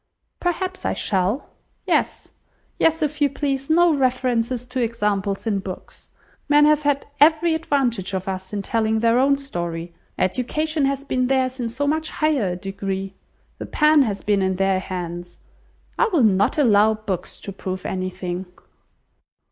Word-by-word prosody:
"Perhaps 370 +1 -2
I - - -1
shall. 195 +6 0 0.4
Yes, - - 0 0.5
yes, 325 -1 +3
if 300 0 -2
you 285 - +4
please, 275 0 -2
no 340 +1 +5
reference 250 -2 0
to 250 +1 -2
examples 210 -4 -1
in 210 -3 0
books. 190 -1 -9 0.4
Men 295 0 +6
have 300 0 +4
had 285 -1 0
every 320 +3 +5
advantage 250 - 0
of 190 0 -4
us 190 0 -4
in 205 -1 -3
telling 220 +1 0
their 230 +1 +3
own 275 +1 +4
story. 170 -10 -5 0.2
Education 285 - 0
has 275 0 -1
been 255 -2 0
theirs 260 0 0
in 235 -2 -2
so 260 +5 -2
much 315 +2 0
higher 280 - 0
a - - -4
degree; 195 +1 -4 0.5
the - - -6
pen 300 -1 +4
has 210 -6 -1
been 205 -1 +2
in 190 0 +1
their 195 0 +1
hands. 175 -2 -6 0.6
I 475 - +4
will 345 - +2
not 200 +2 +3
allow 220 -5 +4
books 210 -4 -5
to 200 - -6
prove 185 -1 -6
anything." 185 -1 -4
235 Hz, 155 wpm, -22 LUFS, 195-285 Hz, 0.6 s, Men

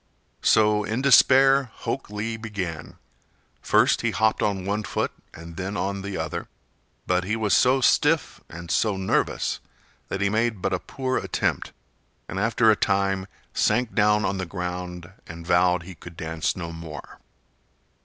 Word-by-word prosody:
So 105 -1 +4
in 115 +5 -2
despair 135 0 +6
Hok - - -4
Lee 105 +2 -3
began. 100 -8 -6 0.6
First - - +3
he - - +1
hopped 110 0 +1
on 100 -3 -1
one 100 +2 -1
foot 105 - -2 0.2
and 85 0 -11
then 95 +2 -4
on 100 0 -2
the 100 0 -5
other, - - -4 0.6
but 90 0 +1
he 105 +4 -1
was 110 -3 0
so 130 +1 +4
stiff 150 +4 +2
and 85 0 -8
so 105 -3 +1
nervous 95 0 0 0.5
that 95 - -4
he 100 - +2
made 110 +1 0
but 90 - -1
a 90 - 0
poor 130 +5 -3
attempt, - - -2 0.6
and 95 - -4
after 115 +1 +3
a - - +4
time 95 -1 0 0.3
sank 125 -2 +1
down 105 -1 +3
on 95 0 -1
the 95 - -3
ground 90 -1 -5 0.2
and 85 0 -9
vowed 90 0 +3
he 95 +2 -9
could 85 0 -13
dance 80 -3 -2
no 85 -3 -6
more. 80 -3 -9
100 Hz, 160 wpm, -24 LUFS, 90-110 Hz, 0.6 s, despair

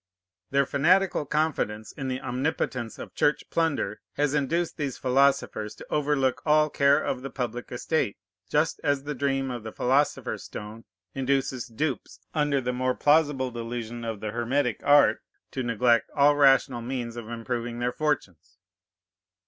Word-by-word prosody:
Their 140 0 +3
fanatical 170 +3 +2
confidence 140 -9 -1
in 135 -2 -6
the 130 0 -3
omnipotence 125 -2 -2
of - - -9
Church 145 - +1
plunder 165 -3 0
has 145 -1 0
induced 155 +4 0
these 140 -4 -3
philosophers 130 -5 +1
to - - -11
overlook 145 -3 +1
all 150 -1 +3
care 140 +1 +4
of 130 -4 -2
the 135 - -5
public 120 -2 -4
estate, 125 -2 -1 0.3
just 155 +2 +1
as 145 -2 +1
the 150 +1 -3
dream 135 -1 -1
of 120 -2 -5
the 110 0 -7
philosopher's 135 +6 0
stone 110 +2 -8 0.3
induces 135 -2 -1
dupes, 130 +4 -3
under 150 -3 +1
the 125 -1 -2
more 130 0 0
plausible 145 -4 +3
delusion 120 0 -5
of 110 -3 -4
the 105 - -3
hermetic 120 +2 0
art, 145 0 +5 0.3
to 130 - -3
neglect 120 -1 +2
all 145 +1 +5
rational 135 -3 +4
means 120 -1 -4
of 115 -2 -7
improving 120 0 -4
their 120 +1 -1
fortunes. 90 - -3
130 Hz, 150 wpm, -26 LUFS, 120-145 Hz, 0.3 s, art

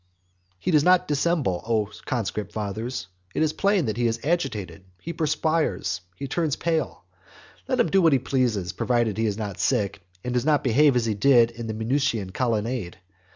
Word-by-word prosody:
XXXIV. 90 0 -43
He 185 - 0
does 150 -3 +4
not 180 +1 +4
dissemble, 145 - 0
O 110 -2 0 0.2
conscript 105 -4 -3
fathers; 110 0 -4 0.3
it - - +2
is 155 -1 +1
plain 200 -5 +2
that 110 -1 -2
he 120 -1 +2
is 115 0 -1
agitated; 110 - -2 0.2
he 170 - -6
perspires; 155 - 0
he 140 - -5
turns 150 +1 0
pale. 165 -2 -2 0.6
Let 255 -1 0
him 240 - +2
do 195 - +4
what 165 -4 +5
he - - +5
pleases, 120 -8 -1
provided 120 +1 0
he 115 - +2
is 105 -1 -2
not 105 -3 -5
sick, 105 -6 0 0.2
and 125 - -3
does 125 -1 +1
not 150 0 +2
behave 135 +2 +4
as 120 -2 +2
he 110 - 0
did 120 +2 +4
in 115 0 -7
the 110 - -3
Minucian 115 -4 0
colonnade. 115 -5 -1
120 Hz, 190 wpm, -25 LUFS, 105-150 Hz, 0.6 s, what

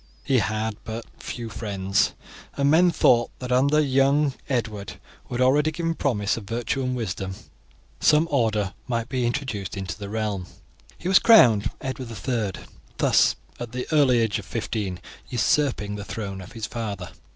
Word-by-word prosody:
He 135 -3 +3
had 110 0 -1
but 115 0 -6
few 120 -2 -6
friends, 100 -3 0 0.4
and 140 0 +3
men 175 +3 +6
thought 120 -8 +3
that 125 -1 -6
under 135 +4 +3
the 155 - +5
young 140 +1 +3 0.2
Edward, 115 -6 -2 0.3
who - - -6
had 125 - 0
already 145 +4 +4
given 165 +1 -1
promise 110 -10 0
of 110 - -7
virtue 120 +5 -2
and 130 -1 -1
wisdom, 95 -5 -3 0.6
some 155 +2 +4
order 110 -7 +1
might 115 -1 -2
be 125 -3 0
introduced 110 -7 -3
into 95 -3 -4
the 100 -1 -6
realm. 105 -4 -2 0.5
He 175 - -6
was 190 - +6
crowned 120 - +6
Edward 130 -2 -5 0.2
III, 110 -7 -1 0.3
thus, - - +4 0.2
at 120 -1 -6
the 125 0 -3
early 140 -5 +5
age 110 -1 0
of 100 - -9
fifteen, 105 -4 -3 0.3
usurping 125 -4 +1
the 105 0 -5
throne 100 -3 -5
of 95 +4 -11
his 115 -2 -4
father. 100 -7 -5
115 Hz, 165 wpm, -24 LUFS, 105-135 Hz, 0.6 s, men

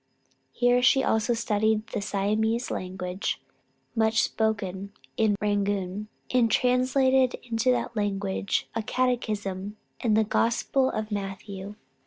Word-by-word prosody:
Here 245 0 +3
she 265 +1 +5
also 220 +2 +2
studied 220 -1 +1
the - - -3
Siamese 215 +4 0
language, 185 0 -3 0.5
much 220 -1 +3
spoken 200 -3 -2 0.2
in 215 -2 +2
Rangoon, 205 -1 -1 0.2
and 245 -3 +3
translated 255 +1 +3
into 235 +1 0
that 245 -1 0
language 200 -2 -1
a 225 - -1
catechism, 210 -5 -1 0.2
and 215 -3 +2
the 220 - +5
Gospel 235 +5 +1
of 215 0 -4
Matthew. 195 0 -5
215 Hz, 115 wpm, -27 LUFS, 200-240 Hz, 0.5 s, she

